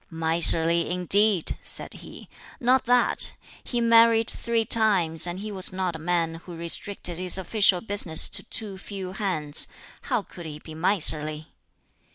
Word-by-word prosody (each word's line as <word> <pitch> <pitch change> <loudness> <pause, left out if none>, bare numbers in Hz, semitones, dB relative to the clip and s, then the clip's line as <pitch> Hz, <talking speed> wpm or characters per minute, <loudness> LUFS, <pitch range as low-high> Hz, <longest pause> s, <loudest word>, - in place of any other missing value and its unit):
"Miserly, 165 +1 +4
indeed!" 185 +1 +1
said - - -8
he; - - -13 0.3
"not 255 +2 +1
that: 245 0 +2 0.3
he 240 - -4
married 230 -1 +3
three 230 -1 -3
rimes, 180 -8 0
and 175 +2 -7
he 215 0 -7
was 190 -2 +1
not 185 -2 -4
a - - -9
man 165 0 -3
who 175 - -10
restricted 170 +1 -3
his 185 0 +3
official 190 -1 +1
business 200 -7 +4
to - - +2
too 205 -5 -5
few 190 -2 -8
hands 170 -7 0 0.4
how 210 - -1
could 175 -4 -12
he 150 -1 -9
be 155 +1 -13
miserly?" 155 -3 -2
185 Hz, 150 wpm, -23 LUFS, 165-210 Hz, 0.4 s, Miserly